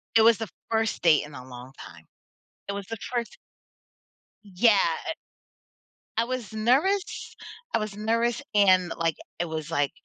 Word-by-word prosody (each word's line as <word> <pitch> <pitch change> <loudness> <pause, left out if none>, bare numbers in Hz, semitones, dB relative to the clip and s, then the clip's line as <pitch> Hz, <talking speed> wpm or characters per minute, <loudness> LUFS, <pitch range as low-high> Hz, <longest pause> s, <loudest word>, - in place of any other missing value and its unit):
it 225 - +7
was 225 0 +6
the 225 - -4 0.2
first 225 -1 0
date 155 -4 +5
in 150 - -12
a 125 -2 -9
long 125 +1 -10
time. 80 -2 -12 0.6
It - - -1
was 200 -1 -5
the 225 - -5
first. 240 0 -4 1.1
Yeah, 205 +3 +4 0.3
it 320 - -2 1.0
I 230 - +4
was 245 -4 -4
nervous 275 - +1 0.4
I - - +5
was 215 -2 -4
nervous 230 +2 0
and, 185 -4 +5
like, 165 -2 +1 0.2
it 175 - +1
was, 160 -1 -4
like, 145 -4 +1
205 Hz, 155 wpm, -26 LUFS, 165-230 Hz, 1.1 s, it